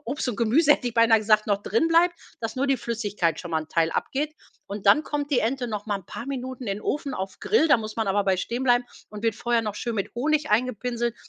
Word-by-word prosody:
Obst 265 +2 -3
und 220 - -2
Gemüse 280 +7 +4
hätte 250 -4 -1
ich 230 - -8
beinah 230 -1 +5
gesagt, 215 0 +3
noch 200 0 +1
drinbleibt, 330 - +3 0.3
dass 225 +1 -4
nur 275 +2 +1
die 270 - +3
Flüssigkeit 205 -9 -2
schon 175 - -8
mal 160 - +1
'n 155 - -15
Teil 165 0 +1
abgeht. 300 +3 -2 0.3
Und 200 0 -7
dann 295 +10 +6
kommt 290 0 -3
die 265 - +3
Ente 245 +2 -1
noch 210 -1 -5
mal 205 -2 0
'n 180 - -24
paar 235 - -7
Minuten 260 -2 -5
in 195 +1 -2
'n - - -13
Ofen 285 -2 -2
auf 190 0 -5
Grill, 375 -7 +3
da 290 - +7
muss 215 -1 -6
man 220 -3 -1
aber 200 +1 +1
bei 190 -1 +2
stehen 240 +7 -3
bleiben 245 -1 +3 0.3
und 210 0 -8
wird 225 -2 +2
vorher 235 -1 +1
noch 210 -2 -3
schön 235 -2 -3
mit 195 - -3
Honig 300 +5 0
eingepinselt. 240 +1 0
235 Hz, 255 wpm, -25 LUFS, 210-265 Hz, 0.3 s, da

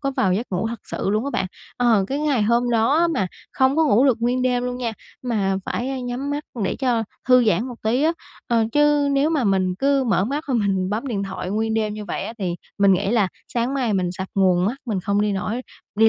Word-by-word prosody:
có 275 -1 -1
vào 190 -8 +1
giấc 225 +6 -1
ngủ 190 +4 -1
thật 235 -1 -5
sự 195 - -3
luôn 215 +4 0
á 280 - -2
bạn, 185 - -1 0.3
ờ, 230 -5 +3
cái 275 - -1
ngày 280 -8 +1
hôm 235 +3 +2
đó 280 +10 +3
mà 255 - 0 0.3
không 265 +2 +2
có 320 - +4
ngủ 260 -2 +4
được 245 -4 +3
nguyên 250 +2 +1
đêm 250 -1 +1
luôn 250 0 -3
nha, 235 -3 -2 0.3
mà 205 -6 0
phải, 245 - -2
a, 270 -1 -3
nhắm 250 +3 -4
mắt 290 +1 -3 0.2
để - - -1
cho 245 -4 +1 0.3
thư 250 -1 +6
giãn 215 +1 +2
một 245 - -6
tí 240 +6 +1
á, 325 +2 +3 0.3
ờ, 230 -2 +2
chứ 295 -1 +3
nếu 280 +3 +2
mà 295 -6 +1
mình 190 -2 +1
cứ 275 +4 +2
mở 195 -5 +2
mắt 285 +6 -3
mà 260 - 0
mình 195 -3 +1
bấm 225 +6 -2
điện 210 -6 -2
thoại 190 -1 -5
nguyên 220 +2 0
đêm 215 -1 0
như 210 -1 -6
vậy 180 - -4
á, 225 - -5
thì 180 -4 -2 0.2
mình 200 -1 +5
nghĩ 195 +2 +1
là 215 -5 +2 0.2
sáng 245 +3 -1
mai 245 -6 0
mình 180 -2 0
sập 190 +1 -5
nguồn 185 -2 +3
mất, 225 +6 0
mình 205 -5 -1
không 200 +2 0
đi 210 -1 +1
nổi 215 +6 -2 0.3
đi 220 +1 +5
230 Hz, 255 wpm, -22 LUFS, 200-260 Hz, 0.3 s, thư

